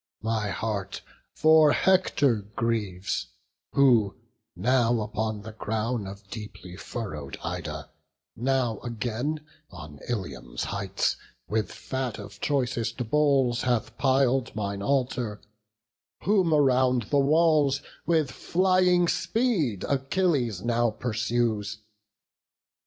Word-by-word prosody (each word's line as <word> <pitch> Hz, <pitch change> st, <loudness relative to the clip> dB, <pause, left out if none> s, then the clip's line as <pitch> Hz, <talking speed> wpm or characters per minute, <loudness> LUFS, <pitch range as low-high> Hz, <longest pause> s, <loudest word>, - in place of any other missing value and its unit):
my 110 Hz, -2 st, 0 dB
heart 100 Hz, +1 st, -3 dB, 0.3 s
For 155 Hz, -1 st, +6 dB
Hector 180 Hz, -10 st, +3 dB, 0.2 s
grieves, 100 Hz, -, -1 dB, 0.5 s
who, 120 Hz, -7 st, +4 dB, 0.4 s
now 120 Hz, +4 st, +2 dB
upon 110 Hz, 0 st, -3 dB
the 110 Hz, -, -7 dB
crown 110 Hz, 0 st, -2 dB
Of 100 Hz, +1 st, -10 dB
deeply 105 Hz, -4 st, -8 dB
furrow'd 90 Hz, -, -6 dB
Ida, -, -, -5 dB, 0.4 s
now 125 Hz, -2 st, 0 dB
again 120 Hz, +6 st, -3 dB, 0.3 s
On 75 Hz, -4 st, -10 dB
Ilium's 85 Hz, -, -4 dB
heights, 100 Hz, -1 st, -1 dB, 0.3 s
with 110 Hz, 0 st, -1 dB
fat 130 Hz, -4 st, -4 dB
of 100 Hz, -1 st, -10 dB
choicest 125 Hz, -4 st, -1 dB
bulls 135 Hz, -5 st, +3 dB
Hath 120 Hz, -2 st, 0 dB
pil'd 135 Hz, -2 st, +2 dB
mine 100 Hz, -2 st, -3 dB
altar; 125 Hz, -3 st, 0 dB, 0.8 s
whom 190 Hz, -4 st, +3 dB
around 130 Hz, -4 st, +3 dB
the 145 Hz, -, +4 dB
walls, 145 Hz, -1 st, +3 dB, 0.2 s
With 160 Hz, -5 st, +2 dB
flying 180 Hz, -1 st, +3 dB
speed 175 Hz, -, 0 dB
Achilles 135 Hz, -, 0 dB
now 120 Hz, 0 st, +2 dB
pursues. 110 Hz, -2 st, -1 dB
120 Hz, 100 wpm, -27 LUFS, 105-140 Hz, 0.8 s, For